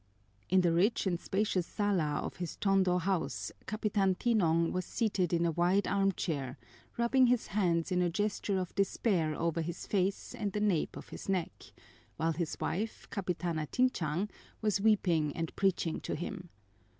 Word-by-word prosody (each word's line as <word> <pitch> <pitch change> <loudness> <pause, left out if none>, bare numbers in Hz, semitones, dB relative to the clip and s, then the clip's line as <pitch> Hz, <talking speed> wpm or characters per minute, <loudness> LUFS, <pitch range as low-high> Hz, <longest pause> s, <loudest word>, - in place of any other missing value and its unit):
In 185 0 +5
the 175 -2 +3
rich 200 +8 +2
and 175 -3 0
spacious 190 -3 0
sala 180 -8 0
of - - -6
his 175 -2 -4
Tondo 190 -3 +3
house, 180 -1 -1 0.2
Capitan 205 -3 +1
Tinong 170 -8 +2
was 185 - -1
seated 200 -7 0
in 170 -1 +2
a 170 - +2
wide 180 +4 +2
armchair, 165 -9 0 0.4
rubbing 250 +2 +4
his 245 -1 +2
hands 175 -4 0
in 180 0 +2
a 175 - +2
gesture 205 +1 -1
of 185 -2 -3
despair 190 -5 +1
over 165 0 0
his 170 +2 -5
face 195 0 -1
and 200 -2 -3
the 210 - -1
nape 205 -6 +1
of - - -10
his - - -8
neck, 185 -4 -2 0.5
while 165 +2 +1
his 165 0 -3
wife, 220 +4 -3
Capitana 175 -5 -2
Tinchang, 195 - 0 0.3
was 210 -2 +1
weeping 175 -8 +2
and 165 -1 -3
preaching 185 -4 0
to - - -3
him. 175 +2 -6
185 Hz, 160 wpm, -32 LUFS, 170-205 Hz, 0.5 s, In